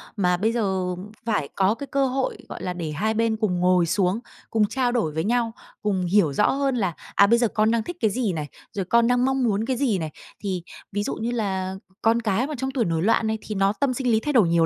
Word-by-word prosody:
mà 180 -3 +2
bây 220 +4 +1
giờ 190 -6 -1 0.3
phải 205 -11 0
có 195 +2 +3
cái 280 +3 -7
cơ 275 -1 +1
hội, 260 +1 -1
gọi - - -7
là, 180 - -2
để 165 -3 -4
hai 210 +9 0
bên 225 0 +1
cùng 190 -5 0
ngồi 180 -1 +4
xuống, 190 +3 +1 0.3
cùng 220 -2 +3
trao 255 0 0
đổi 225 -11 0
với 160 +1 -2
nhau, 235 +1 +1 0.3
cùng 190 -4 0
hiểu 175 -6 +3
rõ - - +3
hơn 275 -1 0
là, 190 -8 0 0.2
à, 200 - +6
bây 235 +2 +4
giờ 240 - +3
con 215 +1 +2
đang 230 -2 +1
thích 350 - -6
cái 220 - +3
gì 220 -5 0
này, 150 -2 -3 0.2
rồi 195 -2 -3
con 235 +5 +4
đang 245 0 +3
mong 265 -1 +1
muốn 215 -1 +1
cái 255 -1 -1
gì 245 -7 +1
này. 160 -3 -4 0.3
Thì 185 -4 -3 0.3
ví 205 +1 -1
dụ - - -2
như 235 +2 -2
là 190 -5 -2 0.3
con 230 +1 +3
cái 220 +4 +1
mà 305 - -4
trong 265 +2 -2
tuổi 255 -4 0
nổi 165 -1 0
loạn 220 +3 +2
này 220 0 0
thì 215 - -6
nó 195 +1 +2
tâm 275 -3 +2
sinh 250 -1 0
lý 220 - +4
thay 295 +5 -2
đổi 220 -8 +5
nhiều 165 -1 +4
215 Hz, 260 wpm, -24 LUFS, 185-240 Hz, 0.3 s, à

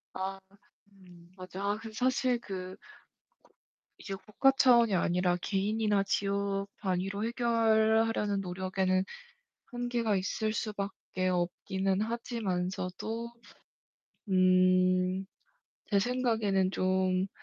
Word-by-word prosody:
아 195 +1 -4 1.0
맞아. 185 +1 -7
아 210 - -2
그 225 -1 -8
사실 255 0 +1
그 185 -3 -7 1.2
이게 195 - -6
국가 215 +7 +2
차원이 240 -5 +5
아니라 180 0 +1
개인이나 210 +1 +1
지역 200 0 -1
단위로 195 +2 -2
해결하려는 225 -3 +2
노력에는 185 0 0 0.6
한계가 240 -3 -1
있을 215 +3 -1
수밖에 200 -3 -3
없기는 190 +2 -1
하지만서도 220 0 -3 1.0
음 185 0 +3 0.6
제 200 -2 +3
생각에는 220 -5 +1
좀 185 0 +1
195 Hz, 205 characters per minute, -30 LUFS, 185-225 Hz, 1.2 s, 차원이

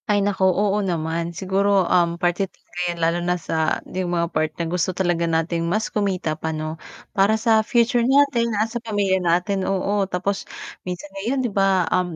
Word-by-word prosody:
Ay, 205 -1 +3
naku. 190 -2 +2
Oo 200 +2 +1
naman. 170 -2 -2
Siguro, 195 +1 +1
um, 170 -1 +2
parte 175 +2 0
talaga 180 - -13
'yan, 170 - -3
lalo 165 +1 +2
na 180 +1 0
sa 160 -2 -1
'yong 185 -1 -3
mga 170 -1 +1
part 155 0 0
na 170 - -2
gusto 180 +2 -1
talaga 175 -2 +1
natin 165 +1 0
mas 215 +5 -1
kumita 190 -6 0
pa, 160 - -3
'no, 155 +1 -5 0.3
para 200 +2 +3
sa 220 0 +3
future 235 +1 +2
natin, 270 -4 +3
ah, 215 - +2
sa 230 +1 -5
pamilya 205 -4 0
natin, 180 +3 +1
oo. 195 +1 0
Tapos 195 +2 -2 0.4
minsan 180 +2 -5
ngayon, 240 +7 -1
'di 235 - -1
ba, 195 -2 +3
um, 180 -2 0
185 Hz, 190 wpm, -22 LUFS, 170-205 Hz, 0.4 s, Ay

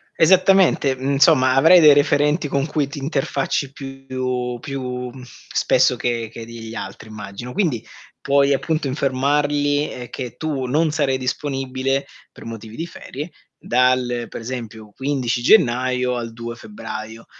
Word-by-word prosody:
Esattamente, 185 -5 +4
mhmm, 135 +2 -2
insomma 135 -2 +5
avrai 160 +7 +7
dei 155 -3 +8
referenti 145 +2 +2
con 140 +1 -1
cui 150 -2 0
ti 140 +1 -7
interfacci 135 -1 -1
più 130 -3 -4
più, 125 -2 -4
mhmm, 130 0 -12 0.3
spesso - - +3
che 115 -2 -2
che 115 0 -8
degli 115 -1 -9
altri 100 +3 -7
immagino. 110 +3 -8
Quindi, 150 - 0 0.4
puoi 140 0 +3
appunto 155 +2 -1
informarli, 145 +2 +1
ehm, 125 -1 -8
che 125 -2 -6
tu 145 -5 -2
non 155 +5 +2
sarai 140 -4 +1
disponibile 135 0 -2 0.3
per - - -14
motivi 115 -1 -8
di 165 - -4
ferie 160 -1 -8 0.3
dal, 125 -1 +1
per - - -7
esempio, 115 -3 -7
15 130 -3 -1
gennaio 125 - +3
al 115 -1 -4
2 115 +1 -7
febbraio. 115 - -8
130 Hz, 140 wpm, -21 LUFS, 120-145 Hz, 0.4 s, dei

